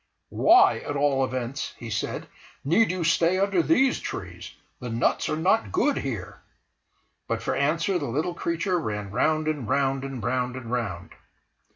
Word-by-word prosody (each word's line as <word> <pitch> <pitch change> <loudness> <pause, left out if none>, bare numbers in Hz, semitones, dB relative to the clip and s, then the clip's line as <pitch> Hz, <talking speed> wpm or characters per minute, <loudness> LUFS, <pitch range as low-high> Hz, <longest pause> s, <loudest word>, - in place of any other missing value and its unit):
"Why, 380 +3 +5
at 145 - -5
all 140 -1 +2
events," 130 +1 -3
he 115 -1 -8
said, 105 - -3 0.4
"need 200 +10 +3
you 180 -1 -2
stay 165 +2 +3
under 195 -2 +2
these 270 - +3
trees? - - -7 0.2
the 125 - -6
nuts 115 +1 0
are - - 0
not 185 +8 +1
good 295 -7 +1
here." 115 -10 -5 0.9
But - - -2
for - - -1
answer 165 +6 +1
the 145 - -3
little 155 +9 -1
creature 170 +2 -1
ran 105 -8 -4
round 155 +7 +1
and 145 -8 -2
round, 135 -1 +1
and 135 -4 -6
round 125 +1 -1
and 120 -3 -7
round. 105 -8 -3
145 Hz, 165 wpm, -25 LUFS, 125-175 Hz, 0.9 s, Why